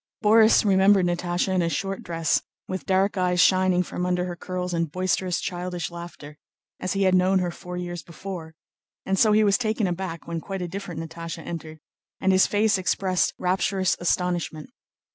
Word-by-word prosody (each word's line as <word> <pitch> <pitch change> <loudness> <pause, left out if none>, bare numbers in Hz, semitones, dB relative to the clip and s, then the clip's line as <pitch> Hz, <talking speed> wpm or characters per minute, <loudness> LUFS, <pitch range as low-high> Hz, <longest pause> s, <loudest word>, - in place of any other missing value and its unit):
Borís 220 +1 +6
remembered 195 -1 +5
Natásha 175 +1 -1
in 185 - +2
a 170 - +1
short 195 +5 -3
dress, 165 -1 0 0.3
with 185 0 -5
dark 195 +1 +2
eyes 180 -1 +1
shining 185 -1 +4
from 180 - -5
under 180 0 0
her 175 -1 -5
curls 180 0 -4
and 165 -2 -1
boisterous, 185 0 0
childish 180 -1 -4
laughter, 170 -3 -10 0.4
as 185 - -2
he 195 0 +1
had 185 -1 +3
known 185 +1 +4
her 180 -2 0
four 180 +1 -8
years 175 -1 -5
before; 170 -2 -8 0.5
and 190 0 0
so 220 - +5
he 215 +1 +5
was 200 0 +3
taken 220 -2 0
aback 175 -2 -4
when 170 -1 -3
quite 195 0 -5
a - - -3
different 175 -2 -6
Natásha 165 0 -7
entered, 160 -2 -7 0.4
and 190 - +2
his 190 0 +5
face 205 -1 +2
expressed 185 +1 0
rapturous 185 +1 +1
astonishment. 175 +1 -1
180 Hz, 180 wpm, -25 LUFS, 175-190 Hz, 0.5 s, Borís